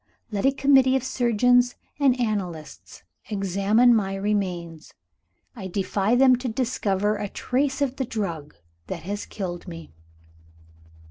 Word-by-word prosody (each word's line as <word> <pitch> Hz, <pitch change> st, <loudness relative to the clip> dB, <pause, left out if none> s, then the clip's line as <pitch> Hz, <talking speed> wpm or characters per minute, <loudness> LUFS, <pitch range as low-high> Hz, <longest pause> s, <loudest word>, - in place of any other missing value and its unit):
Let 205 Hz, +4 st, +1 dB
a -, -, +4 dB
committee 270 Hz, -1 st, +4 dB
of 265 Hz, -, 0 dB
surgeons 245 Hz, -1 st, +2 dB, 0.2 s
and 265 Hz, -3 st, +3 dB
analysts 190 Hz, -9 st, -4 dB, 0.3 s
examine 200 Hz, +4 st, +3 dB
my 195 Hz, -3 st, 0 dB
remains. 180 Hz, -5 st, -3 dB, 0.6 s
I 195 Hz, -5 st, -6 dB
defy 195 Hz, +3 st, 0 dB
them 255 Hz, 0 st, +5 dB
to 250 Hz, +1 st, -5 dB
discover 215 Hz, -4 st, -1 dB
a 205 Hz, -, -4 dB
trace 270 Hz, +5 st, -1 dB
of 270 Hz, -1 st, -3 dB
the 265 Hz, -, -1 dB
drug 170 Hz, -10 st, -5 dB, 0.3 s
that 170 Hz, -, -6 dB
has 205 Hz, +3 st, -5 dB
killed 180 Hz, -3 st, -6 dB
me.' 165 Hz, -, -9 dB
210 Hz, 130 wpm, -24 LUFS, 190-250 Hz, 0.6 s, them